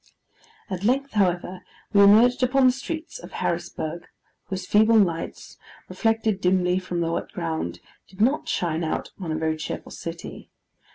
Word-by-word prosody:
At 185 -2 -5
length, 270 +5 +1
however, 180 -2 0 0.3
we 200 - +6
emerged 225 +6 +6
upon 260 +1 +3
the 255 - +7
streets 320 - -6
of - - -12
Harrisburg, 170 +2 -3 0.4
whose 190 -2 -5
feeble 220 +3 +5
lights, 175 -6 -1 0.3
reflected 225 -3 0
dismally 180 0 +2
from 180 -2 -3
the 165 0 0
wet - - -3
ground, 160 - -3 0.3
did 190 - -18
not 260 +8 +2
shine 170 -1 -1
out 160 - -3
upon 175 -5 -5
a - - -1
very 160 0 -1
cheerful 155 - -6
city. - - -8
190 Hz, 155 wpm, -24 LUFS, 170-225 Hz, 0.4 s, the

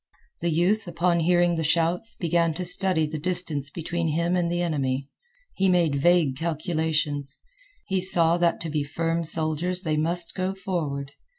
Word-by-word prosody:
The 170 - -1
youth, 180 +6 +1
upon 170 0 0
hearing 175 0 +2
the 160 - -1
shouts, 170 +6 +1
began 170 -2 0
to 180 +1 -4
study 180 -2 +3
the 155 0 -5
distance 160 -4 +2
between 170 +2 -3
him 170 +3 0
and 175 -1 0
the 175 0 -1
enemy. 135 -4 -2 0.4
He 195 0 +1
made 175 -5 +2
vague 155 -1 +2
calculations. 155 -3 -2 0.4
He 190 -2 -1
saw 170 -2 +3
that 175 -1 +1
to 165 - -4
be 150 -1 -1
firm 165 +3 -2
soldiers 165 +3 +1
they 155 -3 -1
must 170 +2 +1
go 185 +1 -3
forward. 155 -8 -4
170 Hz, 165 wpm, -24 LUFS, 155-175 Hz, 0.4 s, study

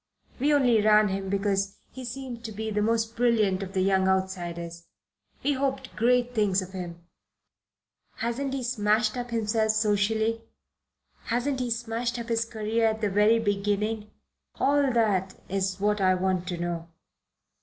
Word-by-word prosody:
We 285 +4 +2
only 250 -7 +4
ran 210 0 +5
him 195 0 -3
because 195 0 0
he 260 - -8
seemed 245 -1 -6
to 220 - -5
be 220 +1 -4
the 210 0 0
most 225 +1 0
brilliant 220 -5 +2
of 195 -1 -6
the 190 - +1
young 190 0 +3
outsiders. 175 -3 -2 0.6
We 290 - +2
hoped 265 -1 -2
great 245 +1 +2
things 205 -4 +2
of 185 - -10
him. 175 -2 -7 1.1
Hasn't 265 +4 -2
he 265 - -3
smashed 215 -2 +1
up 245 -1 -4
himself 220 -1 +1
socially? 220 +1 +1 0.8
Hasn't 255 +3 -1
he 250 -1 -1
smashed 235 +1 -2
up 235 0 -6
his 230 0 +1
career 225 0 0
at 220 0 -1
the 210 -2 0
very 210 +3 +4
beginning? 210 0 -1 0.5
All 280 -1 +3
that 200 -5 +1
is 190 0 -1
what 210 0 +1
I 185 -1 +4
want 185 -1 -1
to 180 -2 -3
know." 170 -1 -4
215 Hz, 155 wpm, -27 LUFS, 195-235 Hz, 1.1 s, ran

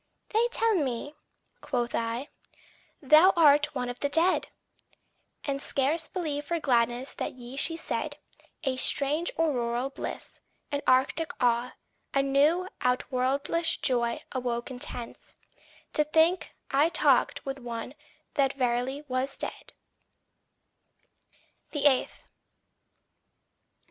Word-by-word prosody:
"They 450 +2 +2
tell 455 -2 +1
me," 285 - -1 0.5
quoth 240 -3 -2
I, 230 +5 -2 0.7
"thou 310 +7 +7
art 295 -2 +5
one 250 -1 -2
of 245 0 -5
the 285 - 0
dead!" 335 +5 +2 1.0
And 275 -1 -2
scarce 295 +4 0
believed 300 -5 -3
for 340 -1 0
gladness 245 -2 +1
the - - -3
yea 245 0 -10
she 325 +4 0
said; - - -3 0.5
A 265 -3 -1
strange 290 +5 +1
auroral 255 -5 0
bliss, - - -7 0.3
an 285 0 -1
arctic 265 +5 +3
awe, 240 0 +1 0.4
A 275 - +4
new, 295 +7 +3
outworldish 270 +6 0
joy 235 -2 0
awoke 245 0 -3
intense, 245 -1 -6 0.6
To 300 - +3
think 320 +4 +2 0.2
I 285 +4 +4
talked 345 - +2
with 270 0 -4
one 235 0 -6 0.4
that 275 -1 +2
verily 255 +2 -1
was 260 +1 -1
dead. - - -6
275 Hz, 110 wpm, -28 LUFS, 250-305 Hz, 1.0 s, thou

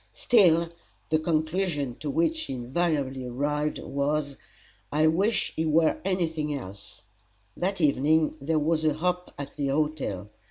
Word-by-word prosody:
] - - -40
Still, 170 -8 +5 0.4
the 155 0 +3
conclusion 155 -4 -1
to 150 - -4
which 165 - +1
she 315 - -5
invariably 135 +1 -1
arrived 150 +4 -1
was, 140 0 -1 0.6
"I 155 +2 +3
wish 190 +8 +2
he 160 - 0
were 160 0 +3
any 185 -2 +1
thing 155 -2 -3
else!" 100 -2 -10 0.5
That 190 +2 -1
evening 155 +1 +3
there 155 +3 0
was 155 +1 +1
a 155 -2 +2
hop 180 +2 -1
at 140 0 -7
the 140 - 0
hotel. 135 -9 -1
155 Hz, 150 wpm, -27 LUFS, 140-165 Hz, 0.6 s, Still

